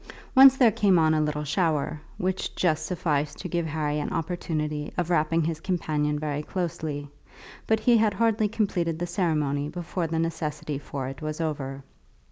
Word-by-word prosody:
Once 270 0 +9
there 245 -4 +6
came 200 -3 +3
on 160 -1 +4
a 155 - +2
little 150 0 -1
shower, 150 -2 0 0.2
which 185 +1 -2
just 160 -4 +1
sufficed 150 -5 -1
to 185 - -5
give 170 -1 -1
Harry 150 -1 -1
an 150 - -2
opportunity 155 -3 -3
of 175 -1 -1
wrapping 165 0 +2
his 160 0 -2
companion 155 -5 -1
very 150 -1 -2
closely, 155 -4 -4 0.6
but 220 0 +3
he 235 +1 +4
had 215 -2 +2
hardly 225 -2 +2
completed 195 -7 -1
the 175 - -2
ceremony 150 -5 0
before 175 +1 -3
the 165 0 -2
necessity 155 -3 -2
for 140 -2 -5
it 135 0 -7
was 155 0 -4
over. 140 -4 -3
160 Hz, 170 wpm, -26 LUFS, 150-180 Hz, 0.6 s, Once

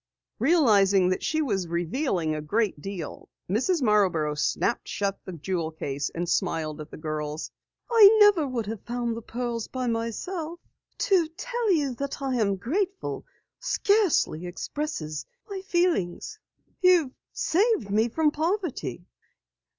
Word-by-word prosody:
Realizing 205 - +4
that 185 - 0
she 315 0 0
was 195 - -1
revealing 170 - -1
a 155 - -3
great 195 +1 0
deal, 190 -5 -7 0.2
Mrs. 265 - +1
Marborough 185 -9 +3
snapped 150 +9 0
shut 200 -1 -2
the - - -6
jewel 170 0 -2
case 140 -3 -3
and 175 +1 -2
smiled 155 -2 -1
at 155 - -9
the - - -10
girls. 155 0 -4 0.4
"I 450 -4 +8
never 380 -10 +5
should 235 -3 -2
have 215 0 -5
found 240 -1 -2
the 230 - -6
pearls 235 0 -4
by 255 -1 -4
myself. 305 - -3 0.4
To 365 -5 +3
tell 480 -4 -1
you 290 -7 +2
that 275 +3 -4
I 270 -2 -2
am 200 -4 +2
grateful 375 - -2 0.3
scarcely 400 - +2
expresses 175 - -4 0.2
my 395 -2 -5
feelings. 345 - 0 0.4
You've 355 -7 +5 0.2
saved 375 - +1
me 220 +3 +2
from 305 +5 +2
poverty." 310 - -2
230 Hz, 135 wpm, -26 LUFS, -, 0.4 s, I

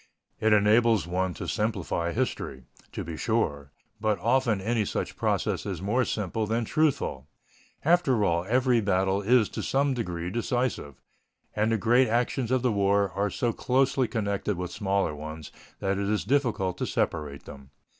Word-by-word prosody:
It 110 - +2
enables 105 +1 +4
one 90 0 -1
to - - -6
simplify 95 -5 -1
history, 65 -5 -3 0.3
to - - -5
be 80 -1 -6
sure, 75 -12 -1 0.3
but 110 -1 +1
often 115 +1 +1
any 110 +3 0
such - - -3
process - - 0
is 95 -5 -4
more 110 +7 +1
simple 105 +1 -2
than 115 +2 0
truthful. 135 - 0 0.6
After 145 -10 +3
all, 85 -1 +1
every 125 -1 +3
battle 95 0 +1
is 115 +1 +4
to - - -5
some 140 0 +1
degree 90 -7 -3
decisive, 120 - -2 0.6
and 105 +2 +1
the 115 - +2
great 120 +5 +4
actions 120 +1 0
of 130 -1 +1
the 125 - +2
war 100 -1 +2
are 100 +2 -1
so 115 +4 -1
closely 135 0 +1
connected 100 -3 -2
with 90 0 -4
smaller 100 -4 0
ones 75 +1 -8 0.3
that 95 0 0
it 100 0 -1
is 105 -1 0
difficult 110 -8 0
to - - -1
separate 75 -3 -2
them. 70 -2 -11
105 Hz, 165 wpm, -27 LUFS, 90-120 Hz, 0.6 s, enables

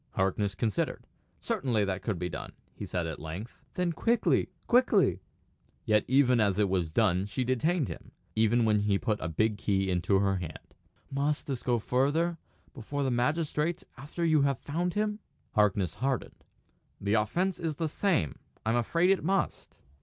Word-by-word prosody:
Harkness 95 +1 0
considered. 110 -2 -1 0.4
"Certainly 115 -6 0
that 95 -1 -2
could 105 -2 -2
be 90 - -2
done," - - -6 0.2
he - - -7
said 90 -2 -2
at 80 -2 -5
length. 85 +10 -7 0.2
"Then 180 -1 0
quickly 235 +7 +2 0.2
quickly!" 240 -5 +3 0.6
Yet 105 -1 +3
even 130 -2 +4
when 100 -2 +2
it 100 -2 +3
was 90 -4 0
done 95 +1 +2
she 130 +5 -2
detained 140 +5 +1
him; - - -8 0.3
even 115 +2 +3
when 105 -1 +3
he 100 -1 +2
put 110 0 -1
a 80 - -2
big 105 +5 0
key 95 -1 +1
into 90 +2 +2
her 95 0 +2
hand. 85 -4 -8 0.4
"Must 145 +2 0
this 135 -4 -3
go 120 -1 +1
further 145 +9 +1 0.3
before 140 +3 -4
the 135 - 0
magistrates 150 +6 0
after 145 +6 -4
you 155 -3 +4
have 140 -2 +2
found 175 +7 -2
him?" 210 0 0 0.3
Harkness 100 -5 +2
hardened. 130 -2 -3 0.6
"The 100 +1 -1
offence 175 - +1
is 160 -3 -2
the 160 +2 -1
same. 155 - 0 0.3
I'm 115 +2 +2
afraid 170 +10 +2
it 195 - +1
must." 195 +3 -1
120 Hz, 170 wpm, -29 LUFS, 100-155 Hz, 0.6 s, even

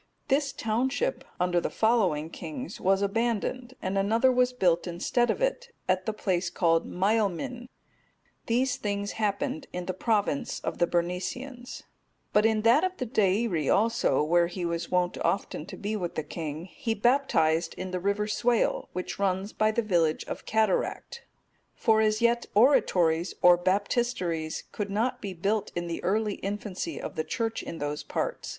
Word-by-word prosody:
This 275 0 +2
township, 260 - -1 0.2
under 180 -1 +2
the - - -2
following 185 -9 +1
kings, 170 - -7
was 195 +1 +3
abandoned, 235 +4 -1
and 190 +1 0
another 225 +6 +3
was 250 0 +3
built 180 -8 +1
instead 210 +8 0
of - - 0
it, - - -2
at 185 0 +1
the - - +2
place 185 -4 -1
called 165 -2 +2
Maelmin.(240) 220 +5 0 0.8
These 250 +2 +1
things 205 -1 -2
happened 260 +8 -2
in 180 0 -4
the 185 - -2
province 205 - 0
of - - -4
the 175 - +3
Bernicians; 190 +10 -3 0.5
but 210 +1 +5
in 220 -1 +1
that 235 +8 +5
of 370 0 -1
the 255 - -2
Deiri 200 - +1
also, 220 - +2
where 170 +2 +3
he 175 0 -4
was 170 0 -2
wont 180 -1 0
often 185 -4 -1
to - - -8
be 215 +1 -3
with 180 -5 -3
the 155 - -2
king, 155 +1 -5
he 225 +3 -3
baptized 175 - +2
in 185 0 -5
the 185 - -2
river 200 +3 0
Swale, 235 +2 +1
which 180 +2 -4
runs 195 +1 0
by 215 - +2
the 225 +2 0
village 170 -6 +1
of - - -7
Cataract;(241) 220 - 0 0.5
for 220 -1 +3
as 215 +1 +1
yet 235 0 +2
oratories, 180 - +3
or 180 0 +9
baptisteries, 185 -3 -1
could 205 -1 -4
not 220 +6 -1
be 195 -3 -5
built 205 +4 -1
in 175 0 -2
the 170 -1 -4
early 210 +2 0
infancy 205 - -4
of - - -6
the 155 - -1
Church 225 +5 -2
in 165 - -7
those 145 0 -3
parts. - - -3
205 Hz, 165 wpm, -28 LUFS, 175-235 Hz, 0.8 s, or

